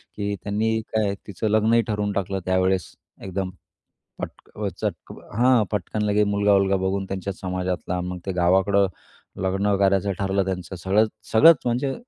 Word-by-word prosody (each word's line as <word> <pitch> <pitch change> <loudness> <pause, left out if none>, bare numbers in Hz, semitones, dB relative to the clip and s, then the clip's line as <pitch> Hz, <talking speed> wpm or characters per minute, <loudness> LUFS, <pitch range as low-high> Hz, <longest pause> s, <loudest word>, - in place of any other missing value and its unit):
की 100 0 -2
त्यांनी 110 +2 0
काय 105 -2 +1
तिचं 105 +2 -3
लग्नही 110 +2 +4
ठरवून 105 -1 -1
टाकलं 95 0 -2
त्यावेळेस, 95 -1 +1 0.3
एकदम 95 0 -3 0.7
पटक - - -9 0.2
चटक - - -4 0.2
हा 125 -1 +5
पटकन 105 +1 -2
लगेच 105 0 +2
मुलगा-वुलगा 100 -1 +3
बघून 95 +1 -1
त्यांच्याच 95 0 -5
समाजातला. 90 -1 -2
मग 90 0 -4
ते 95 - -1
गावाकडं 95 +3 +3 0.6
लग्न 95 +2 +1
करायचं 100 0 +2
ठरलं 100 0 +1
त्यांचं 95 0 -4
सगळंच, 100 +5 +2 0.2
सगळंच 160 +8 +8
म्हणजे 125 +3 0
100 Hz, 140 wpm, -24 LUFS, 95-105 Hz, 0.7 s, सगळंच